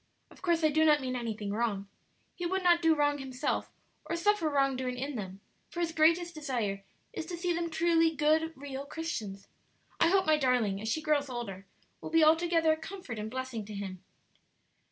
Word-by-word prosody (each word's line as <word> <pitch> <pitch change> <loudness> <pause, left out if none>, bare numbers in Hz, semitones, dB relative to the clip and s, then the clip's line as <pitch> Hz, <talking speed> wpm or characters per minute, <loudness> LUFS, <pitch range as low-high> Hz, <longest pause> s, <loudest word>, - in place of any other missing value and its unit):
Of - - -17
course 340 -3 +1
I 310 - +5
do 315 +1 +3
not 300 -1 +5
mean 255 -1 -3
anything 220 -4 -3
wrong; 205 -2 -1 0.5
he 350 - -3
would 380 +1 -1
not 345 -1 +5
do 325 -1 +4
wrong 290 -1 +1
himself 270 +2 -2 0.3
or - - -2
suffer 340 -2 +2
wrong 275 -2 +2
doing 255 -1 -3
in 275 +3 -3
them; 195 -3 -6 0.3
for 345 - -7
his 340 -1 0
greatest 335 +2 +3
desire 235 -10 -3 0.3
is 320 - -5
to 350 - -5
see 350 0 0
them 335 0 -2
truly 330 -1 +2
good, 310 +2 +2
real 275 0 -6
Christians. 220 - -5 0.5
I 335 - +5
hope 380 +1 +3
my 310 0 +4
darling, 245 -8 +1
as 220 - -3
she 315 +7 -1
grows 290 -2 +1
older, 200 -6 -6 0.3
will - - -6
be 325 0 +4
altogether 325 +1 +4
a - - -4
comfort 320 - -7
and 215 +1 -4
blessing 260 -2 -4
to 210 0 -8
him." 190 -2 -6
295 Hz, 195 wpm, -30 LUFS, 235-330 Hz, 0.5 s, I